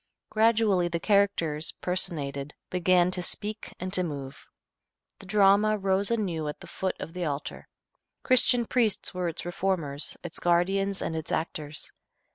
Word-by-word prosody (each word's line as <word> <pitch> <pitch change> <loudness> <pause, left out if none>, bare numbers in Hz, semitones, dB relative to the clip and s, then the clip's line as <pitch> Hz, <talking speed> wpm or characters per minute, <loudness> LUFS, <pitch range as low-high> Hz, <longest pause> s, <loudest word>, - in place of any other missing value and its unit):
Gradually 215 -5 +3
the 170 -1 -2
characters 170 -6 +1
personated 150 -6 -3 0.2
began 180 0 +3
to 185 - -1
speak 210 +4 -3
and 185 +1 -4
to 185 - +3
move. 140 -6 -6 0.7
The 195 - -13
drama 205 +2 +4
rose 195 0 +1
anew 185 -9 -1
at 150 - -5
the - - -11
foot 190 -1 -3
of 165 - -7
the 180 -1 -3
altar. 145 -1 -4 0.6
Christian 245 -1 +4
priests 225 -5 0
were 180 -1 -1
its 165 - -4
reformers, 175 -5 -1
its 175 -1 -6
guardians 195 +3 +1
and 160 - -2
its 160 0 -5
actors. 155 -2 -4
180 Hz, 145 wpm, -28 LUFS, 160-200 Hz, 0.7 s, drama